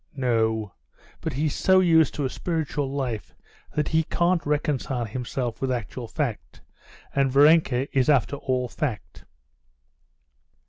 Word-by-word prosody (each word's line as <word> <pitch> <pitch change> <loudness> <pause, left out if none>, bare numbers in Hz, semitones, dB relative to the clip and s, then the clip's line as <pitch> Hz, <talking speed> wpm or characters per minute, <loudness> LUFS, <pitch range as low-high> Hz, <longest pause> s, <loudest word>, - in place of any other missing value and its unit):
"No, 110 - 0 0.5
but 160 - -3
he's 145 +3 0
so 190 0 +4
used 165 -4 +4
to 145 - -1
a - - -1
spiritual 155 -5 -2
life 125 -7 -4 0.4
that 150 - 0
he 160 0 +3
can't 170 +2 +1
reconcile 145 -4 -1
himself 120 +1 -4
with 135 -1 0
actual 120 0 -4
fact, 125 -4 -4 0.5
and 135 -1 +2
Varenka 140 -2 +4
is 130 +1 +3
after 140 -1 +3
all 130 -2 -1
fact." 105 - -5
135 Hz, 130 wpm, -25 LUFS, 120-150 Hz, 0.5 s, so